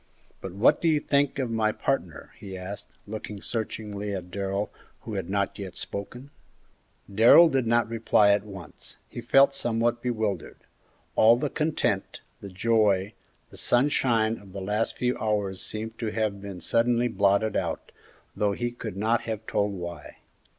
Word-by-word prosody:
But 95 Hz, -, -6 dB
what 115 Hz, +10 st, +3 dB
do 170 Hz, -, +1 dB
you 155 Hz, -2 st, +4 dB
think 140 Hz, -1 st, +1 dB
of 130 Hz, -4 st, -2 dB
my 110 Hz, -1 st, +1 dB
partner?" 110 Hz, -, -3 dB
he 95 Hz, -2 st, -8 dB
asked, 95 Hz, +2 st, -7 dB, 0.2 s
looking 105 Hz, -1 st, -7 dB
searchingly 105 Hz, -2 st, -4 dB
at 90 Hz, -1 st, -7 dB
Darrell, 100 Hz, +1 st, -2 dB, 0.3 s
who 110 Hz, -, -7 dB
had 95 Hz, -3 st, -4 dB
not 100 Hz, 0 st, -1 dB
yet 95 Hz, -2 st, -7 dB
spoken. 125 Hz, +7 st, -7 dB, 0.8 s
Darrell 120 Hz, +11 st, +8 dB
did 130 Hz, -5 st, 0 dB
not 115 Hz, 0 st, +3 dB
reply 110 Hz, -2 st, +3 dB
at 100 Hz, 0 st, +2 dB
once; 95 Hz, -6 st, -10 dB
he 120 Hz, -, -7 dB
felt 135 Hz, +4 st, +5 dB
in -, -, -21 dB
some 115 Hz, -1 st, -1 dB
way 120 Hz, +1 st, +4 dB
bewildered. 110 Hz, -8 st, -2 dB, 0.6 s
All 115 Hz, +2 st, +6 dB
the 145 Hz, +2 st, -2 dB
content, 150 Hz, -10 st, -1 dB, 0.2 s
the 100 Hz, -, -8 dB
joy, 100 Hz, 0 st, +2 dB, 0.4 s
the -, -, -11 dB
sunshine 120 Hz, -4 st, +2 dB
of 95 Hz, -2 st, -15 dB
the 100 Hz, -, -5 dB
last 105 Hz, +4 st, -1 dB
few 125 Hz, 0 st, 0 dB
hours 105 Hz, -3 st, -1 dB
seemed 110 Hz, +1 st, -5 dB
to 115 Hz, -, -2 dB
have 105 Hz, -2 st, -2 dB
been 100 Hz, -3 st, -8 dB
suddenly 120 Hz, +1 st, +2 dB
blotted 100 Hz, -1 st, +2 dB
out, -, -, -3 dB, 0.4 s
though 105 Hz, -1 st, +1 dB
he 120 Hz, +4 st, -2 dB
could 110 Hz, -4 st, -7 dB
not 110 Hz, +3 st, +1 dB
have 110 Hz, 0 st, -4 dB
told 105 Hz, -1 st, 0 dB
why. 85 Hz, -5 st, -7 dB
110 Hz, 165 wpm, -26 LUFS, 100-120 Hz, 0.8 s, Darrell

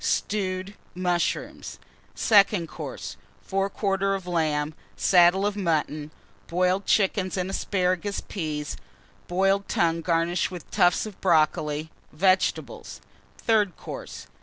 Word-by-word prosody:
Stewed 190 Hz, -1 st, -1 dB, 0.2 s
Mushrooms. 180 Hz, -1 st, -2 dB, 0.4 s
SECOND 200 Hz, -5 st, +4 dB
COURSE. -, -, -7 dB, 0.3 s
Fore 195 Hz, +1 st, -1 dB
quarter 195 Hz, -1 st, 0 dB
of 190 Hz, -2 st, -6 dB
Lamb. 155 Hz, -3 st, 0 dB, 0.2 s
Saddle 180 Hz, +2 st, +5 dB
of 205 Hz, 0 st, 0 dB
Mutton. 155 Hz, -5 st, -1 dB, 0.4 s
Boiled 185 Hz, +3 st, +1 dB
Chickens 195 Hz, -2 st, +2 dB
and 185 Hz, +1 st, -2 dB
Asparagus 185 Hz, 0 st, -1 dB
Peas. 155 Hz, -5 st, -4 dB, 0.5 s
Boiled 195 Hz, +2 st, +1 dB
Tongue 165 Hz, -1 st, +1 dB
garnished 170 Hz, +1 st, +1 dB
with 180 Hz, -3 st, -9 dB
Tufts 175 Hz, +3 st, +3 dB
of 210 Hz, -4 st, -10 dB
Brocoli. 155 Hz, -2 st, +1 dB, 0.2 s
Vegetables. 185 Hz, +4 st, 0 dB, 0.4 s
THIRD 210 Hz, -6 st, +1 dB
COURSE. -, -, -8 dB
185 Hz, 110 wpm, -26 LUFS, 165-195 Hz, 0.5 s, Saddle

